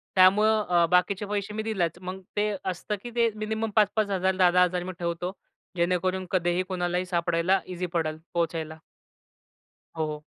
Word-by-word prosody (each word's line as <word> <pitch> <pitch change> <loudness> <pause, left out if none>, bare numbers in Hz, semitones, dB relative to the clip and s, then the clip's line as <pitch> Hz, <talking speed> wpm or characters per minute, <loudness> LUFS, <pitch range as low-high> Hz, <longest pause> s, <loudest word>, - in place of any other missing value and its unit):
त्यामुळं 210 +3 +5
अ, 175 -1 +4
बाकीचे 185 +3 +2
पैसे 205 0 -3
मी 215 +1 -3
दिलाच. 185 -7 -1
मग 185 +1 -6 0.2
ते 210 +1 +2 0.2
असतं 185 +4 -4
की 240 - -6
ते 235 -1 +4
मिनिमम 220 +1 -2
5,000-5,000 200 -3 +2
10,000-10,000 180 -1 +4
मी 185 - -5
ठेवतो. 170 +1 -2 0.4
जेणेकरून 185 +2 0
कधीही 175 -1 +1
कोणालाही 180 -1 -1
सापडायला 175 +1 +1
ईझी 180 0 -4
पडेल 155 -2 -1 0.2
पोहचायला. 165 -2 -2 1.2
हो. 155 -1 -2
185 Hz, 140 wpm, -27 LUFS, 175-205 Hz, 1.2 s, त्यामुळं